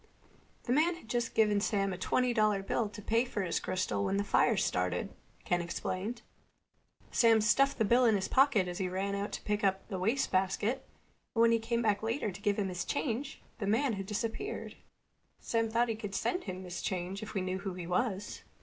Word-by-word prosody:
"The 245 - 0
man 325 +5 +3
had 335 - -14
just 240 0 -2
given 210 -2 +3
Sam 195 -2 0
a - - -5
twenty 250 +5 +1
dollar 215 -3 +2
bill 215 +2 0
to 210 +1 -9
pay 225 +3 +2
for 230 -5 -3
his 170 - 0
crystal 110 - -1
when 195 - 0
the 200 - +1
fire 215 +2 +3
started," 90 - 0 0.3
Ken 175 0 +1
explained. 190 +6 -4 0.9
"Sam 225 -2 +5
stuffed 275 +6 +3
the 220 - +2
bill 240 +4 +4
in 225 -2 +5
his 190 -1 -1
pocket 260 -9 +4
as 175 +1 -5
he 185 -1 -1
ran 195 +2 -2
out 200 +1 -2
to - - -5
pick 210 0 -1
up 190 -1 +1
the 190 - -3
wastebasket, 200 0 0 0.5
and - - 0
when 230 - +5
he 230 - +3
came 235 +1 -1
back 205 -2 +2
later 225 -1 -1
to 195 +2 -11
give 205 -1 +1
him 200 -2 0
his 180 -1 -3
change 270 0 -3 0.2
the 200 - -2
man 235 +5 +2
had 195 -2 -5
disappeared. 230 - -4 0.6
Sam 225 -1 0
thought 235 +2 +2
he 225 - 0
could 210 -3 -6
send 360 - -1
him 185 -1 -5
his 180 -1 -6
change 185 +1 -3
if 215 0 -8
we 195 - +1
knew 185 0 -2
who 195 -2 -5
he 180 -2 -6
was." 195 +3 -1
210 Hz, 215 wpm, -32 LUFS, 190-230 Hz, 0.9 s, Sam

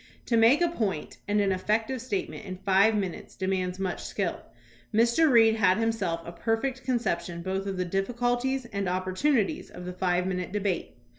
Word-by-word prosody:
To 235 - +1
make 230 +8 +5
a 345 - +4
point 215 - -3
and 210 0 +2
an 200 -1 +2
effective 220 +7 0
state 220 -6 -2
ment - - -9
in 185 -1 -6
five 195 +3 +3
minutes 190 -4 -4
demands 185 -1 -1
much 190 -2 -3
skill. - - -2 0.5
Mr. 235 +8 +4
Reed 225 -2 +6
had 190 -3 +4
himself 215 -7 -1
a 170 - -6
perfect 235 +8 -2
conception 175 -9 -1
both 190 +1 -2
of 195 -1 -3
the 180 - 0
difficulties 245 +7 -1
and 200 -5 -3
opportunities 185 +6 0
of 180 - -9
the 180 - -5
five 180 0 0
minute 180 -1 -3
debate. 200 -3 -2
200 Hz, 175 wpm, -27 LUFS, 185-235 Hz, 0.5 s, Reed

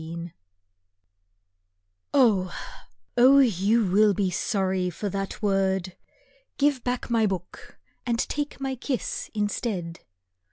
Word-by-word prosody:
VII 170 +1 -7 1.8
Oh, 210 -10 +3 0.6
oh, 260 +3 +7
you 220 -3 +3
will 205 +2 +4
be 195 -2 0
sorry 185 0 0
for 200 +4 -4
that 195 +3 -5
word! 190 -2 0 0.6
Give 280 -3 +2
back 245 -1 -3
my 225 -2 +3
book 185 -3 -6 0.3
and 235 -2 0
take 290 +4 -3
my 270 -1 -2
kiss 260 -1 -3
instead. 205 -5 -2
205 Hz, 110 wpm, -26 LUFS, 185-240 Hz, 1.8 s, oh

